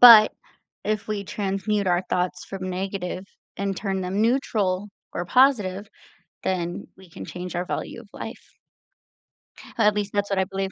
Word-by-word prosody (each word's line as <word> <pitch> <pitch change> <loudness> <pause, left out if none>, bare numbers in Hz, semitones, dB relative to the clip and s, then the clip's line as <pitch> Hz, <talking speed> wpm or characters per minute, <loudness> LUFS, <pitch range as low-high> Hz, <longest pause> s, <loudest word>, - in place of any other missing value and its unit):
but, 230 -3 +11 0.5
if 215 -1 0
we 205 -2 -1
transmute 200 +1 -1
our 175 0 +3
thoughts 180 0 0
from 185 -1 -5
negative, 185 0 -3 0.3
and 195 -1 -1
turn 195 -2 -1
them 185 +3 -1
neutral, 210 -5 +2 0.2
or 175 - -2
positive, 210 -6 +4 0.5
then 175 -2 -1
we 190 -2 -15
can 95 - -8
change 180 - -5
our 175 - 0
value 235 - -4
of 220 - -15
life. - - -8 1.2
At 210 -2 +5
least, 205 -1 -1
that's 205 0 +1
what 195 -1 +1
I 190 - +3
believe. 195 0 -2
195 Hz, 155 wpm, -25 LUFS, 185-210 Hz, 1.2 s, but